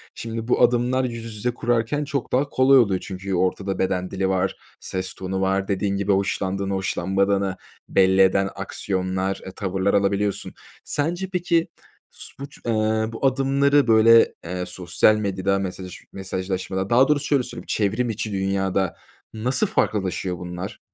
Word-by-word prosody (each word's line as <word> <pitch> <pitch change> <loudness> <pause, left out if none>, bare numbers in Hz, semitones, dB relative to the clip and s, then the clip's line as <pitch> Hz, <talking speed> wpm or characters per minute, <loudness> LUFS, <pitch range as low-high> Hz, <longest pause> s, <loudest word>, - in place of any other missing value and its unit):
Şimdi, 115 0 -5
bu - - +2
adımlar 125 +2 +3
yüz 115 -3 -5
yüze 120 +4 -1
kurarken 120 +4 0
çok 140 -3 -3
daha 140 +3 +1
kolay 135 +1 +5
oluyor. 100 -6 +2
Çünkü 95 0 -6
ortada 95 +2 -1
beden 95 -1 -1
dili 95 0 -1
var, 95 0 0 0.2
ses 95 0 -4
tonu 95 0 -4
var, 95 0 0
dediğin 100 0 0
gibi 100 0 0
hoşlandığını, 95 0 0
hoşlanmadığını 95 +1 0 0.3
belli 95 0 +4
eden 95 +1 +3
aksiyonlar, 95 -1 -2
eee, 95 - -7
tavırlar 95 0 -1
alabiliyorsun. 100 0 0 0.3
Sence, 175 +6 -2
peki, 170 -2 +1 0.4
su - - -9
buç 140 +1 -9
eee, 115 - 0 0.4
bu 115 - -3
adımları, 135 +1 +3
böyle, 115 +1 +6
eee, 90 +2 -4
sosyal 90 +3 +2
medyada, 100 -2 0
mesajı 90 -1 -6
mesajlaşmada, 95 0 -3
daha 125 +3 +5
doğrusu 145 -1 +1
şöyle 140 -4 +2
söyleyeyim, - - -9
çevrim 110 +4 0
içi 110 0 -3
dünyada 95 -1 0 0.4
nasıl 125 - 0
farklılaşıyor 95 - -1
bunlar? 90 +1 -7
100 Hz, 145 wpm, -23 LUFS, 95-120 Hz, 0.4 s, böyle